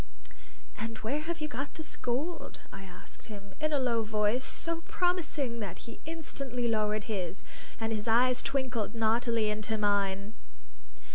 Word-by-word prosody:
"And 225 +1 -3
where 265 +7 +1
have 330 +1 -3
you 305 - +1
got 275 +1 -4
this 315 - -4
gold?" 280 +8 -2
I - - -6
asked 180 -1 -10
him, 200 -3 -8
in 310 0 +2
a 295 - +4
low 245 -4 +3
voice 215 +3 +2
so 335 0 +2
promising 310 -9 +1
that 200 -6 -3
he 230 - -8
instantly 275 -7 -2
lowered 215 -1 +2
his, 190 -4 -2 0.4
and 225 0 0
his 215 +1 -2
eyes 250 +2 +5
twinkled 255 -5 0
naughtily 225 -1 +3
into 215 +1 -1
mine. 200 0 +2
230 Hz, 150 wpm, -32 LUFS, 210-275 Hz, 0.4 s, eyes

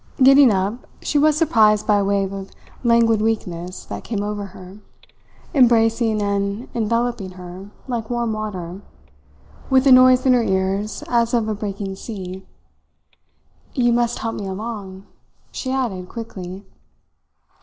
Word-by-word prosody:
Getting 270 0 +8
up, 200 +4 -1 0.2
she 295 - +1
was 305 0 +3
surprised 220 -10 +3
by 210 -2 +3
a - - +1
wave 195 -1 0
of 195 0 -7 0.3
languid 230 -2 +3
weakness 185 -5 -3
that - - -7
came 205 -3 -3
over 205 -1 -3
her, 190 0 -12 0.7
embracing 225 -4 +3
and 200 +3 -2
enveloping 230 -3 -1
her 180 +2 -10 0.2
like 235 -3 -3
warm 240 -2 -1
water, 195 -4 -5 0.9
with 265 0 +4
a 270 - +6
noise 255 0 +7
in 260 - +5
her 245 - +4
ears 195 +1 -1
as 235 0 +1
of 225 -2 +1
a 215 - -1
breaking 200 -2 -5
sea. 190 -4 -7 1.3
"You 240 -2 +3
must 240 0 +1
help 225 0 -3
me 200 - -5
along," 195 -1 -6 0.5
she 260 - -4
added 220 -9 -2
quickly. 195 -5 -8
215 Hz, 140 wpm, -21 LUFS, 195-235 Hz, 1.3 s, Getting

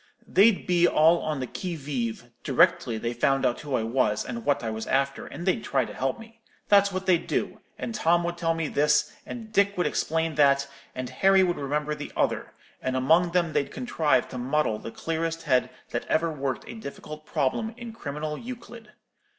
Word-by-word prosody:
They'd 205 +1 +4
be 175 -1 +4
all 165 +2 +5
on 150 -3 -2
the - - -1
qui 175 +7 -5
vive 120 -5 -4
directly 115 - +3
they 115 +2 -2
found 135 +3 +2
out 120 - +1
who 145 -3 -2
I 115 - 0
was, 115 -2 +1
and 115 -2 -5
what 145 -3 +1
I 110 - -2
was 110 0 -5
after, 135 +1 0
and 175 - -7
they'd 205 +4 +1
try - - +1
to - - -9
help 135 - -2
me. 225 0 -14 0.3
That's 200 -1 +5
what 185 0 -3
they'd 180 -3 +2
do; - - -2 0.2
and 235 - -4
Tom 175 -4 +2
would 175 0 -2
tell 165 -1 0
me 165 -1 -1
this, 150 +1 +2
and 225 -2 -8
Dick 200 -1 +3
would 180 - +1
explain 165 0 0
that, 140 -1 +4 0.3
and 130 0 -4
Harry 195 0 +4
would 175 -1 0
remember 150 +2 -1
the - - -7
other; - - -1 0.3
and 130 0 -1
among 165 +7 +3
them 170 -3 +1
they'd 140 - 0
contrive 165 -12 +1
to 125 - -6
muddle 130 -3 0
the - - -7
clearest 165 +4 -3
head 130 -5 +2 0.2
that - - -3
ever 165 +1 +1
worked 135 -6 -3
a - - -7
difficult 155 -6 -9
problem 220 - -1
in 235 -2 -8
criminal 150 -5 -5
Euclid. 235 -2 -10
155 Hz, 200 wpm, -26 LUFS, 135-185 Hz, 0.3 s, all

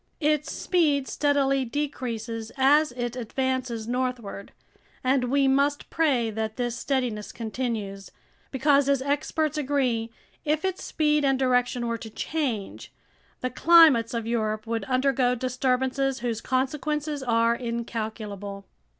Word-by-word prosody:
Its 300 -1 +1
speed 295 -7 +1
steadily 275 -2 +1
decreases 235 -5 -4
as 295 +3 +4
it 240 -1 -3
advances 255 -1 -2
northward, 245 -5 -3 0.5
and 255 0 +2
we 275 +2 +2
must 280 +2 +1
pray 260 -9 +2
that 220 0 -3
this 240 -1 -2
steadiness 240 -5 -2
continues, 220 -4 -4 0.4
because, 280 +1 +3
as 275 -2 +2
experts 300 +2 -1
agree, 260 -5 0 0.3
if 310 +3 0
its 380 -1 -2
speed 300 -1 +1
and 270 -1 +3
direction 250 -2 +1
were 230 -1 -2
to 225 - -8
change, 245 -5 -3 0.5
the 255 - -2
climates 305 -7 +6
of 230 -1 -2
Europe 215 -2 -1
would 230 0 -2
undergo 255 -1 +2
disturbances 260 +1 0
whose 230 -2 -2
consequences 295 +3 -1
are 230 -2 +2
incalculable. 220 -4 -5
255 Hz, 125 wpm, -26 LUFS, 230-280 Hz, 0.5 s, climates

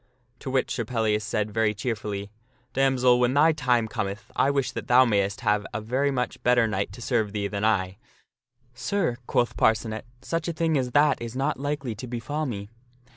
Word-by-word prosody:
To - - -6
which 130 0 0
Sir 120 - -1
Pellias 110 -2 0
said 105 0 -1
very 110 -1 +1
cheerfully, 105 -3 -4 0.2
" 125 -1 -39
Damsel, 130 -2 +3
when 125 +2 +2
thy 155 +3 +6
time 125 -7 +1
cometh 100 0 -4
I 135 - +3
wish 140 -2 0
that - - -6
thou 125 +1 +6
mayst 100 -3 0
have 105 -3 +2
a - - 0
very 130 +6 0
much 125 -3 -2
better 125 -1 +4
knight 100 -2 -2
to 120 - -9
serve 110 -5 0
thee 105 -1 -2
than 100 0 -3
I." 95 -4 +1 0.4
" 125 -1 -41 0.2
Sir," 180 -12 +1
quoth 120 -1 +1
Parcenet, 110 0 +1
" - - -33
such 165 +3 -2
a 170 - -1
thing 165 0 0
as 125 -3 -1
that 145 -3 +4
is 115 +1 -6
not 135 +1 -1
likely 145 -3 -2
to 110 +4 -8
befall 135 +6 -3
me." 100 -4 -5
120 Hz, 205 wpm, -26 LUFS, 105-135 Hz, 0.4 s, thy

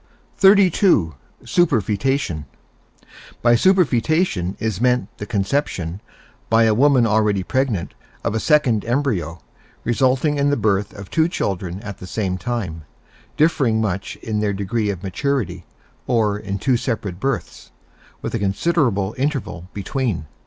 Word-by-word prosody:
XXXII. 190 - +5 0.3
SUPERFOETATION 115 - +1 1.0
By 120 0 +5
superfoetation 155 - +2
is 110 -2 -2
meant 125 -3 +1
the 105 - -5
conception, 100 - -1 0.5
by 115 0 +5
a 110 -1 +4
woman 130 +1 +4
already 105 -3 +2
pregnant, 125 -5 -1 0.3
of - - -1
a 110 - 0
second 130 -7 +3
embryo, 110 - -1 0.4
resulting 130 +4 +1
in 140 0 +3
the 145 - +1
birth 105 -1 +1
of 100 -2 -10
two 160 0 +3
children 95 - -3
at 100 -3 -8
the 90 - -9
same 95 -2 -2
time, 95 -6 -3 0.6
differing 145 -8 +2
much 100 -3 -2
in 110 -2 -2
their 105 -1 0
degree 105 +2 -1
of 95 -2 -4
maturity, 95 - -2 0.4
or 110 -4 +2
in 100 -1 -4
two 125 +4 +1
separate 105 -7 -3
births, 135 -1 -3 0.5
with - - -4
a - - -1
considerable 105 - +1
interval 110 - -2
between. 105 - -2
110 Hz, 130 wpm, -21 LUFS, 95-135 Hz, 1.0 s, XXXII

